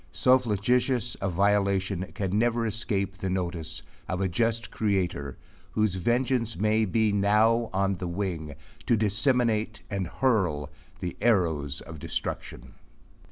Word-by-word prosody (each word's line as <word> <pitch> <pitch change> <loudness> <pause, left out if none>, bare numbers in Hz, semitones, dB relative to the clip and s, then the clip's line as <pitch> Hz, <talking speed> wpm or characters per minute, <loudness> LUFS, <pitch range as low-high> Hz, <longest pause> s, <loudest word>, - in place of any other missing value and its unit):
So 130 +1 +4
flagitous 120 +2 +1
a 100 - 0
violation 100 0 +1
can 100 -2 -1
never 120 0 +1
escape 100 -3 -1
the 95 - -3
notice 85 -3 -3 0.3
of 90 - -1
a 95 - +1
just 115 +5 0
Creator 90 - -1 0.4
whose 110 -3 +2
vengeance 120 +3 0
may 110 +3 +2
be 110 +2 +2
now 110 +3 +3
on 95 0 0
the 90 - -4
wing, 85 -5 -3 0.3
to 115 - +4
disseminate 110 0 +1
and 95 -3 -1
hurl 90 - 0 0.3
the 90 -2 -3
arrows 80 - +1
of 80 -2 -10
destruction. - - -5
100 Hz, 130 wpm, -27 LUFS, 90-115 Hz, 0.4 s, So